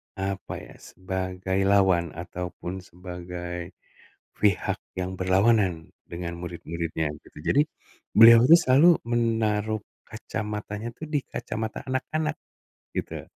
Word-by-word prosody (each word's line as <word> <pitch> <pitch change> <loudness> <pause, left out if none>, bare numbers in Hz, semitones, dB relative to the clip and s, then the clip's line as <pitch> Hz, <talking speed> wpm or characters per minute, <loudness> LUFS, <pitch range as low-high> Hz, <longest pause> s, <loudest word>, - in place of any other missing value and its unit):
apa 95 0 -4
ya, - - -13
sebagai 95 +1 -3
lawan 95 -5 +3
ataupun 90 +1 -6
sebagai 90 0 -7 0.6
pihak 100 -4 +1 0.2
yang 95 +1 -3
berlawanan 95 -2 +2 0.2
dengan 85 0 -5
murid-muridnya, 85 -2 -3
gitu. - - -18
Jadi, 140 - +4 0.5
beliau 115 +1 +10
itu 165 - +10
selalu 155 +4 +5
menaruh 110 -3 +1 0.3
kacamatanya 105 +1 -5
itu, - - -10
di 150 - +1
kacamata 110 0 -4
anak-anak, 150 +4 -1 0.6
gitu. - - -4
95 Hz, 105 wpm, -26 LUFS, 90-110 Hz, 0.6 s, beliau